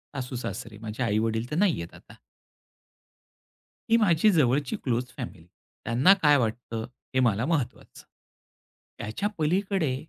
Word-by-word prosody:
सासू-सासरे. 120 -4 -5
माझे 110 +2 -4
आई-वडील 110 +1 0
तर - - -1
नाही 180 - +2
आहेत 85 - -9
आता. - - -16 1.7
ही 230 - +7
माझी 205 -2 +4
जवळची 145 -4 +2
क्लोज 125 -1 0
फॅमिली. 80 - -7 0.4
त्यांना 130 +11 +5
काय 150 -2 +6
वाटतं 115 -1 -2 0.3
हे - - +4
मला 115 -2 +2
महत्वाचं. 150 -5 -3 0.9
त्याच्या 195 - -3
पलीकडे, 175 -2 0
125 Hz, 120 wpm, -27 LUFS, 115-160 Hz, 1.7 s, ही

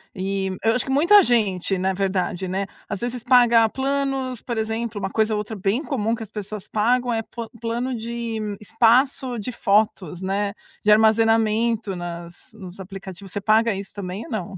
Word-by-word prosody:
E 195 0 -2 0.2
eu 225 0 +4
acho 250 - -1
que 265 - -3
muita 345 +9 +6
gente, 195 - +1
na 190 +1 0
verdade, 190 -1 -1
né, 195 +2 -2 0.2
às 205 - -4
vezes 240 -1 -3
paga 240 -3 +5
planos, 270 -2 -1
por 235 -2 -4
exemplo, 220 0 -2
uma 195 0 -2
coisa 220 0 +1
outra 210 +1 -4
bem 200 +9 0
comum 230 -7 -1
que 230 - -4
as 210 - -10
pessoas 210 -1 -6
pagam 245 +3 +1
é 225 - 0
po 230 0 -8
plano 240 +2 -2
de 230 0 -4 0.2
espaço 245 +3 +2
de 210 - -4
fotos, 200 -5 +1
né? 200 +1 -1 0.3
De 210 - +4
armazenamento 220 -1 +3
nas 175 +4 -7
nos 190 -3 -10
aplicativos. 190 0 -9
Você 205 - -3
paga 220 +2 +3
isso 195 0 -7
também 195 +1 -6
ou 315 - -12
não? 190 -3 -4
220 Hz, 175 wpm, -23 LUFS, 195-235 Hz, 0.3 s, muita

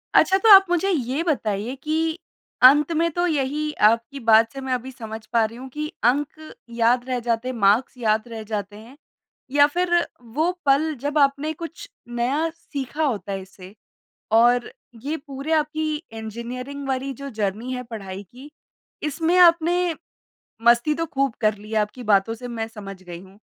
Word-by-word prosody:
अच्छा 380 - +5
तो, 440 +3 +2
आप 390 -1 +10
मुझे 355 +3 +1
ये 280 -1 -1
बताइए 230 - -1
कि 320 +2 -1 0.5
अंत 295 +5 +7
में 335 +1 +1
तो 350 +3 0
यही 300 0 -1 0.2
आपकी 230 +5 0
बात 225 -1 +4
से 270 - -7
मैं 265 -1 -2
अभी 255 +1 -4
समझ 220 -3 -8
पा 230 -1 +4
रही 230 +2 -7
हूँ 260 +1 -8
कि 305 0 -3 0.2
अंक 285 +5 +1 0.3
याद 235 +1 +2
रह 250 - 0
जाते 230 +1 0
हैं, 255 - -3
मार्क्स 220 +5 +2
याद 220 -1 0
रह 225 -2 -7
जाते 205 -1 -5
हैं 235 +6 -14 0.5
या 285 0 +6
फ़िर 355 +3 -1 0.5
वो 340 +3 +3
पल 295 +3 +3
जब 290 +1 -2
आपने 280 +2 +2
कुछ 335 +1 -9 0.2
नया 255 +7 -1
सीखा 295 -2 -5
होता 210 -9 -2
है 195 -1 -3
इससे 190 +1 -14 0.6
और 240 +2 +4 0.3
ये 305 +3 -2
पूरे 280 +1 -5
आपकी 310 0 0 0.2
इंजीनियरिंग 245 +5 -6
वाली 265 +1 -2
जो 275 +2 -8
जर्नी 220 +3 -3
है 250 - -4
पढ़ाई 200 -4 -7
की, 255 - -14 0.5
इसमें 325 +4 0
आपने 345 0 +4 0.7
मस्ती 240 +6 +5
तो 330 +2 -2
ख़ूब 275 -4 -1
कर 215 -1 +2
ली 210 +1 -13
है 220 - -1
आपकी 210 +4 -4
बातों 200 +4 +1
से 245 +2 -8
मैं 225 -2 -4
समझ 195 -4 -10
गई 175 -1 -9
हूँ। 190 +2 -17
255 Hz, 175 wpm, -23 LUFS, 225-305 Hz, 0.7 s, आप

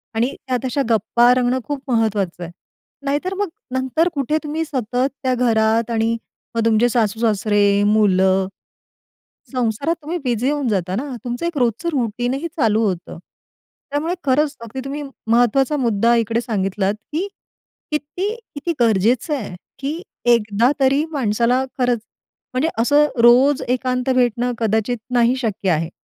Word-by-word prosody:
आणि 240 +4 0
त्यात 255 0 -1
अशा 270 +2 0
गप्पा 235 +2 +4
रंगणं 250 0 +1
खूप 285 0 -4
महत्त्वाचं 205 -6 0
आहे. 170 - -7 0.5
नाहीतर 290 +7 -1
मग 405 -3 -1 0.2
नंतर 260 +6 +1
कुठे 290 +1 0
तुम्ही 305 +2 -2
सतत 255 -3 -1 0.2
त्या 255 - +2
घरात 225 -2 +2
आणि 225 0 +1 0.4
मग 230 - +1
तुमचे 230 +1 +4
सासू-सासरे, 210 -3 +2
मुलं, 190 -3 +3 1.0
संसारात 255 +5 0
तुम्ही 325 +4 -3
बिझी 245 +1 0
होऊन 290 -3 -1
जाता 185 -3 -1
ना. 265 +4 -4
तुमचं 245 +6 -3
एक 340 -3 -3
रोजचं 245 +6 0
रूटीनही 245 +4 -1
चालू 225 -5 +2
होतं, 180 -4 -3 0.7
त्यामुळे 310 +4 -1
खरंच 290 +2 +2
अगदी 230 +3 -7
तुम्ही 290 +2 -4 0.3
महत्त्वाचा 245 +4 +3
मुद्दा 235 -2 +2
इकडे 230 0 +1
सांगितलात, 195 -3 -1 0.2
की 340 +6 -1 0.6
किती 305 +8 -2 0.2
किती 335 +4 -2
गरजेचं 230 - +2
आहे, 200 -8 -6 0.2
की 295 +5 -3 0.3
एकदा 225 +2 +2
तरी 275 +3 +3
माणसाला 245 -1 +1
खरंच, 245 -3 +1 0.5
म्हणजे 275 +6 +1
असं 290 +4 +4 0.2
रोज 255 +4 +6
एकांत 255 +1 0
भेटणं 245 0 +1
कदाचित 220 +2 0 0.2
नाही 245 +1 +4
शक्य 215 -6 -2
आहे. 165 0 0
245 Hz, 140 wpm, -20 LUFS, 220-275 Hz, 1.0 s, रोज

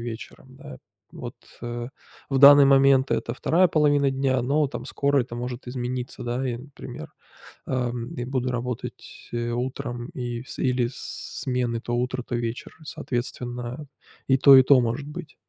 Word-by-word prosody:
вечером, 120 +3 -9
да, 145 -2 -10 0.4
вот, 120 -1 -7 0.3
э, 120 0 -5 0.4
в 135 - +1
данный 140 +1 +9
момент- 135 -1 +5
это 115 - -1
2 175 +7 +3
половина 145 -2 +3
дня, 135 -1 +1
но 145 +2 +1
там - - -7
скоро 140 0 +1
это 120 -1 -5
может 125 +1 -5
измениться, 125 0 -4
да. 125 +2 -2
И 120 - -2
например, 135 +3 -10 0.6
ам, 125 -2 -3
и 120 - -4
буду 130 -1 -2
работать, 120 0 -6
э, 120 0 -2
утром 120 0 -4
и 120 -1 -4
с - - -9
или 125 -2 +1
смены, 125 -3 -3
то 120 0 -3
утро, 125 +1 -2
то 120 - -4
вечер. 120 +1 -4
Соответственно, 125 0 -5 0.4
и 135 0 +4
то, 135 0 +9
и 130 - +9
то 130 0 +6
может 120 +5 -2
быть. 155 +1 -9
125 Hz, 160 wpm, -25 LUFS, 120-135 Hz, 0.6 s, данный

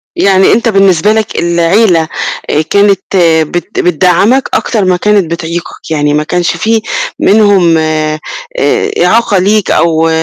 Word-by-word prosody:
يعني 195 -1 +3
أنت 230 +1 +1
بالنسبة 195 -1 +2
لك 220 -1 -2
العيلة، 170 +1 +1 0.4
آآ، 150 - +1
كانت 200 +4 +1 0.5
بت 175 +6 -5
بتدعّمك 180 - +1
أكتر 215 -5 -1
ما 180 -1 +1
كانت 200 -3 0
بتعيقك، 170 0 -6
يعني 145 -1 0
ما 150 +1 0
كانش 170 +2 -2
في 220 +5 0 0.4
منهم 195 -6 +3
آآ 155 -1 -2 0.9
إعاقة 230 -3 +1
ليك 205 +2 +1
أو 165 -1 +1
180 Hz, 130 wpm, -9 LUFS, 165-205 Hz, 0.9 s, يعني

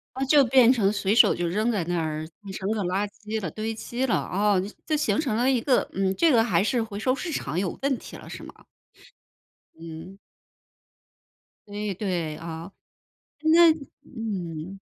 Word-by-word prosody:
那 265 +1 -1
就 285 +1 +6
变 250 -1 +6
成 205 -6 +2
随 205 0 0
手 - - +6
就 175 0 -2
扔 215 +7 0
在 205 -6 0
那 175 0 -1
儿 155 0 -3
变 200 -2 -9
成 190 +1 -3
个 215 -2 -1
垃 190 +3 0
圾 215 +1 -6
了， 180 - -3
堆 220 +1 -3
积 240 +3 -3
了， 245 - +1
啊， 205 +2 +1 0.3
就 310 - 0
形 300 - +1
成 260 -8 0
了 245 +3 +2
一 255 -3 +2
个， 255 +1 +2
嗯， 190 0 0
这 335 -2 +4
个 230 -4 +5
还 180 -7 +2
是 230 +2 +1
回 205 -2 -7
收 255 +4 +1
市 340 +4 -5
场 170 - -3
有 185 -2 -2
问 270 -1 +1
题 - - -10
了 - - -12
是 - - -8
吗？ - - -10 1.2
嗯。 165 +3 -9 1.5
对 205 0 -4
对 175 -5 -2
啊。 165 +2 -7 0.7
那 330 +2 +7 0.3
嗯。 190 - -5
210 Hz, 195 characters per minute, -25 LUFS, 180-245 Hz, 1.5 s, 那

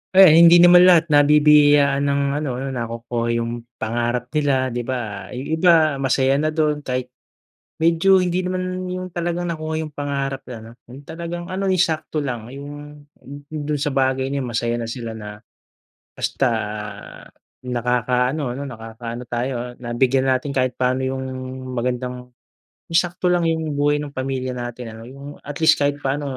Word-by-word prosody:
Eh, 190 -1 +9
hindi 170 +1 +8
naman 175 +1 +8
lahat 170 -3 +5
nabibiyayaan 145 -1 +5
ng 140 0 +1 0.2
ano 150 -1 -2
ano 135 - -3
nakukuha 115 -1 -3
yung 115 0 -3 0.2
pangarap 120 +2 -2
nila, 135 -2 +1
'di 120 -1 -4
ba? 110 -7 -4
Yung 135 +6 -3
iba 160 -4 +4
masaya 135 0 +2
na 155 +1 0
dun 150 -2 0
kahit 125 -1 -3 0.7
medyo, 170 +4 +4
hindi 180 0 0
naman 185 0 -3
yung 185 0 -5
talagang 175 0 -3
nakuha 160 -1 -3
yung 160 - -4
pangarap 140 -1 -3
na 125 - -8
ano, 110 +1 -12
yung 125 +3 -12
talagang 170 +3 -7
ano 190 +1 -3
yung 190 -2 +2
sakto 155 -2 0
lang. 120 -4 -5
Yung 140 +1 -8 0.8
dun 150 -1 -3
sa 145 - 0
bagay 130 -1 0
na 140 -1 -2
yun - - -5
masaya 120 0 -1
na 120 - -4
sila 115 -1 -6
na, 105 -1 -9 0.8
basta 135 -2 0 1.1
nakakaano, 125 +3 0 0.2
ano, - - -5
nakakaano 115 0 -7
tayo 120 +2 -2 0.2
ah, - - -11
na 120 -1 -6
bigyan 130 +2 +2
natin 130 +2 -3
kahit 130 -2 0
paano 130 +1 0
yung 130 0 -3 0.6
magandang 125 +1 -3 0.7
yung 165 - +6
sakto 180 0 -1
lang 175 -2 +2
yung 160 -1 -1
buhay 145 +1 +2
nung 145 -1 -5
pamilya 130 -1 -3
natin 120 -1 -6
ano. 115 +1 -11
Yung 140 +2 -11
at 145 0 -8
least 160 - +5
kahit 145 0 +1
papano, 140 -1 -3
140 Hz, 165 wpm, -21 LUFS, 125-155 Hz, 1.1 s, Eh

